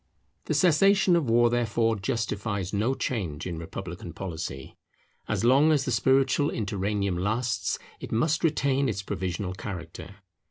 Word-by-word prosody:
The - - -1
cessation 190 +2 +4
of 155 -8 +1
war 120 +1 +4
therefore 115 -1 +1
justifies 100 -2 -2
no 110 +6 +1
change 85 - -3
in 85 -3 -4
republican 85 0 -7
policy. 80 -7 -6 0.5
As - - -1
long 140 +6 +5
as 145 -3 +2
the 125 - -1
spiritual 135 +5 +3
interregnum 100 -3 -1
lasts, 115 +6 -1 0.2
it - - -8
must 150 +9 +1
retain 140 -4 +2
its 100 -3 -3
provisional 95 0 -3
character. 95 0 -8
110 Hz, 135 wpm, -27 LUFS, 95-130 Hz, 0.5 s, long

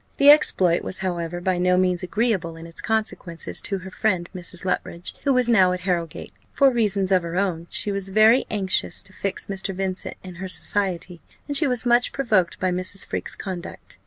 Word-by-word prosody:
The 285 +1 +8
exploit 185 - +3
was, 190 - -2
however, 175 -1 -3
by 180 0 -1
no 180 0 +3
means 180 -1 +1
agreeable 190 -4 -1
in 165 0 -10
its 165 0 -7
consequences 215 -6 -3
to 200 - -2
her 190 0 -9
friend 185 -4 0
Mrs. 180 0 -5
Luttridge, 175 -1 -3
who 280 - +3
was 250 -2 +2
now 190 -6 +4
at 180 - -4
Harrowgate. 175 -3 -3 0.2
For 275 -2 +4
reasons 205 -5 +1
of 185 -1 +4
her 170 0 -6
own, 175 -4 -1
she 205 - -2
was 195 -1 -3
very 220 +5 +5
anxious 195 -3 0
to 190 - -13
fix 195 0 -3
Mr. 195 -1 -3
Vincent 190 0 -4
in 185 -1 -9
her 190 - -4
society, 180 -2 -1 0.3
and 285 - -3
she 300 +1 +5
was 250 -2 0
much 240 0 +3
provoked 210 -10 +1
by 185 0 0
Mrs. 185 +2 +1
Freke's - - -5
conduct. 185 -3 -8
190 Hz, 195 wpm, -23 LUFS, 180-215 Hz, 0.3 s, The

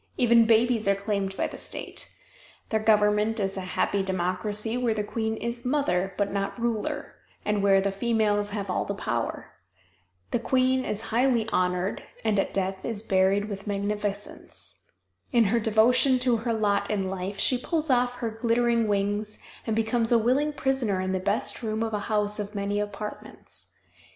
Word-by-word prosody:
Even 235 -2 +5
babies 230 -1 +3
are 200 - +4
claimed 200 -1 -2
by - - +1
the - - -6
state. - - -6 0.6
Their 220 - +1
government 215 +1 +3
is 195 -1 -1
a 190 - -3 0.2
happy 200 - +2
democracy 190 +4 -1
where 245 -3 +1
the 210 - -1
queen 220 +1 -2
is 235 +1 -4
"mother" 195 -9 0
but 205 -1 0
not 200 +4 -2
ruler, 235 +6 -2 0.3
and 210 -1 +1
where 195 -1 +5
the 195 +1 0
females 205 -1 +1
have 205 -1 -4
all 180 - 0
the - - -4
power. - - -3 0.8
The - - +1
queen 260 +1 +2
is 210 - -2
highly 240 -2 +3
honored 180 +1 0 0.2
and 215 -3 +2
at - - 0
death 190 0 -2
is 220 -2 -4
buried 195 0 +2
with 200 -1 -7
magnificence. 205 0 -4 0.4
In 235 -4 +5
her 225 +3 +2
devotion 230 +4 +4
to 250 -2 +2
her 230 +2 -2
lot 205 -2 +1
in 195 -3 0
life 190 +1 -4
she 255 - +2
pulls 315 +1 -1
off 245 0 +2
her 235 -2 -3
glittering 230 0 +1
wings 205 +1 0 0.3
and 220 - 0
becomes 225 +1 +1
a 235 - +6
willing 260 +7 +2
prisoner 265 -9 0
in 185 0 -1
the 190 - 0
best 200 +3 -1
room 220 -1 -1
of 225 -1 -3
a 210 - 0
house 210 -1 +1
of 205 0 -5
many 200 +1 -1
apartments. 210 0 -6
215 Hz, 175 wpm, -26 LUFS, 200-235 Hz, 0.8 s, a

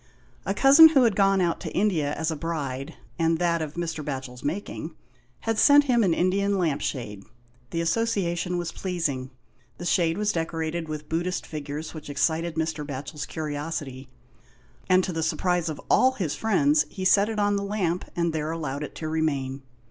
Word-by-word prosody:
A - - 0
cousin 280 +4 +9
who 275 -5 +4
had 225 -5 +3
gone 195 -1 +3
out 170 -2 0
to - - -6
India 175 -8 +1
as 160 +2 -1
a - - -2
bride, 145 -4 -4 0.2
and 165 0 +2
that 170 -1 +1
of 155 -1 -5
Mr. 165 -3 -3
Batchel's 130 -3 -6
making, 175 +8 -4 0.5
had 225 -1 -1
sent 290 0 +7
him 245 -5 +2
an 185 - +3
Indian 200 +2 +1
lamp 155 -6 0
shade. 105 -9 -4 0.5
The 165 - -2
association 180 -2 0
was 175 -1 -3
pleasing. 160 -10 -3 0.5
The 175 - -7
shade 170 -1 +2
was 210 0 +1
decorated 165 0 -3
with 150 0 -5
Buddhist 175 +3 -2
figures 150 0 -6
which 155 -2 -9
excited 160 +4 0
Mr. 160 -1 -2
Batchel's 145 +1 -6
curiosity, 145 -4 -5 0.8
and 185 0 +5
to 180 - -3
the 165 - -2
surprise 175 +1 0
of 155 - -5
all 260 +1 +4
his 180 - -2
friends 285 +8 +2
he 190 -2 -6
set 200 +3 +4
it 220 - -4
on 205 0 +2
the 200 - -1
lamp 190 -4 -1
and 170 -1 0
there 155 -1 -2
allowed 150 -4 -3
it - - -8
to 155 - -5
remain. 140 -4 -1
165 Hz, 180 wpm, -26 LUFS, 150-190 Hz, 0.8 s, cousin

